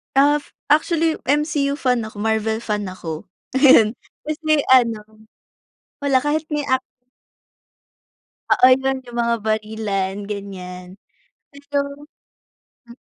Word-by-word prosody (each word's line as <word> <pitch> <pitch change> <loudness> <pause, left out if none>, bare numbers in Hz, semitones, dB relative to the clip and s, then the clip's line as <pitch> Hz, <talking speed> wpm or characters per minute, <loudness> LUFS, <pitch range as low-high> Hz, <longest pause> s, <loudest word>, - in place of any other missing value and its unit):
Af, 290 +2 +3 0.2
actually 320 +1 +2
MCU 290 0 +1
fan 250 -5 0
ako, 220 -1 -10
Marvel 220 0 0
fan 210 -3 -2
ako. 165 -4 -6 0.3
Ayun. 250 -5 +6 0.2
Kasi 310 -1 0
ano, 220 -4 +2 0.8
wala 275 -2 +3
kahit 295 +3 -1
may 295 -1 -2
ac 260 -1 +2 1.7
Oo, 255 - +6
yun 270 0 0
yung 240 -1 -9
mga 235 0 +1
barilan, 215 -3 -2
ganiyan. 185 -3 -7 0.6
Pero 285 0 -4 1.1
hmm. 235 +2 -14
240 Hz, 105 wpm, -21 LUFS, 215-285 Hz, 1.7 s, Ayun